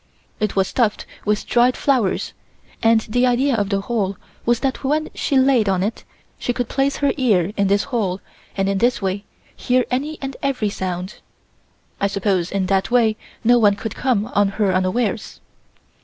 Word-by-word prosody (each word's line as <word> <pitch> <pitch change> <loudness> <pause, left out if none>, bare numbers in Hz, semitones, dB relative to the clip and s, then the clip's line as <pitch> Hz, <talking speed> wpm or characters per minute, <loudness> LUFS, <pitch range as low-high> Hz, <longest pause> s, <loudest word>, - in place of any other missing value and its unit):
It 215 -2 -1
was 190 -1 +2
stuffed 225 -5 0 0.2
with 210 0 0
dried 245 +1 +3
flowers, 250 -9 0 0.5
and 225 0 +4
the 245 +4 +1
idea 255 +3 +2
of 205 -3 0
the 200 -1 0
hole 200 -3 -2 0.3
was 240 -1 +2
that 270 0 -2
when 300 +3 0
she 280 - 0
laid 260 -6 +4
on 185 -1 +1
it 215 +3 -3 0.3
she 245 - -1
could 245 -1 -2
place 275 +1 0
her 285 -1 +1
ear 205 - +2
in 200 -1 +1
this 200 +1 +2
hole 210 -8 -2 0.4
and 195 0 +1
in 195 0 0
this 245 +1 +2
way 195 0 -2 0.3
hear 250 0 +1
any 290 +5 -2
and 270 -1 -5
every 255 -7 0
sound. 185 0 -4 0.8
I 200 - +2
suppose 195 -3 0
in 195 -1 0
that 190 +2 +1
way 230 -3 +3 0.3
no 240 +1 +5
one 205 -3 +4
could 220 +2 -5
come 240 -6 0
on 205 0 +3
her 200 -3 +2
unawares. 190 +4 -1
220 Hz, 180 wpm, -20 LUFS, 195-250 Hz, 0.8 s, no